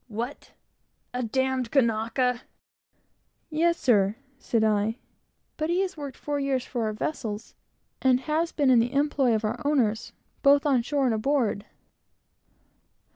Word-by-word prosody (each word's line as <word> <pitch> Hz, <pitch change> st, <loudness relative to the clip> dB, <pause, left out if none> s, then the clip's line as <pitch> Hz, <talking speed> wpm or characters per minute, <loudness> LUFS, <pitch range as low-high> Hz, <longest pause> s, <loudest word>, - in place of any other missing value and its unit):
"What? 235 Hz, +5 st, -6 dB, 0.6 s
a 250 Hz, -, -2 dB
d 235 Hz, -, -2 dB, 0.3 s
d 240 Hz, -, -5 dB
Kanaka?" 240 Hz, 0 st, +1 dB, 1.1 s
"Yes, 335 Hz, +2 st, +2 dB
sir," 205 Hz, -4 st, +3 dB, 0.2 s
said 230 Hz, -4 st, 0 dB
I; 215 Hz, +1 st, +1 dB, 0.6 s
"but 310 Hz, +1 st, -2 dB
he 355 Hz, +2 st, +2 dB
has 380 Hz, -1 st, -2 dB
worked 285 Hz, -3 st, -7 dB
four 290 Hz, -1 st, -3 dB
years 270 Hz, -2 st, -1 dB
for 240 Hz, -3 st, -2 dB
our 215 Hz, -, -1 dB
vessels, 215 Hz, -3 st, -4 dB, 0.5 s
and 255 Hz, -1 st, +3 dB
has 315 Hz, +4 st, -1 dB
been 280 Hz, -4 st, +2 dB
in 245 Hz, -, +6 dB
the 240 Hz, +3 st, 0 dB
employ 275 Hz, -4 st, +2 dB
of 220 Hz, 0 st, -1 dB
our 215 Hz, -, -3 dB
owners, 240 Hz, -7 st, 0 dB, 0.3 s
both 280 Hz, 0 st, +5 dB
on 270 Hz, -4 st, +3 dB
shore 275 Hz, +3 st, 0 dB
and 245 Hz, -, +2 dB
aboard." 220 Hz, -3 st, 0 dB
255 Hz, 145 wpm, -26 LUFS, 225-285 Hz, 1.1 s, in